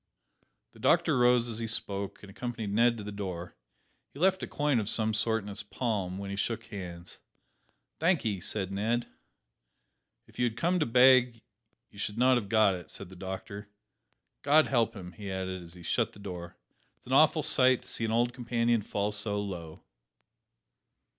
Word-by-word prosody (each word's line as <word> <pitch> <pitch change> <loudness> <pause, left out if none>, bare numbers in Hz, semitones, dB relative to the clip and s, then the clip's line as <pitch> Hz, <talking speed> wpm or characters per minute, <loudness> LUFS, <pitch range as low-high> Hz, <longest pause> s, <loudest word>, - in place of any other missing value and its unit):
The - - -18
doctor - - +3
rose 125 -1 +4
as 115 -1 -4
he 115 - -3
spoke, 100 -4 -3
and 100 - -11
accompanied 115 -2 -5
Ned 115 +2 +3
to 105 - -7
the 105 - -6
door. 90 -4 -6 0.5
He 140 - -13
left 190 +2 +3
a - - -4
coin 145 -4 +1
of 105 -1 -2
some 110 -1 +2
sort 110 0 +1
in - - -10
his 100 +1 -6
palm, 105 -4 -3
when 100 0 -5
he - - -3
shook 115 +2 -2
hands. 90 -4 -9 0.8
"Thankee," 145 - +1
said 95 +1 -1
Ned. 115 +5 0 1.2
"If - - -17
you 125 - +3
had 115 -1 -5
come 175 +5 +1
to 150 - +1
beg, 125 -1 +5 0.5
you 100 - -14
should 105 +1 -3
not 130 +2 +5
have 105 -5 -4
got 110 -3 +4
it," 90 -1 -8
said 100 - -9
the 95 - -12
doctor. 100 +3 -7 0.7
"God 150 +2 +5
help 120 -4 +1
him!" 90 -3 -8
he 100 +2 -7
added 95 -1 -4
as 85 0 -12
he 85 - -12
shut 115 +5 0
the - - -15
door; 90 -3 -8 0.4
"it - - -42
is - - -28
an 130 - -4
awful 155 +2 +5
sight 130 -4 +3
to - - -12
see - - -2
an 110 - 0
old 120 +2 +1
companion 120 -2 0
fall 100 0 -2
so 105 0 -1
low." 85 -6 -6
110 Hz, 190 wpm, -29 LUFS, 100-120 Hz, 1.2 s, beg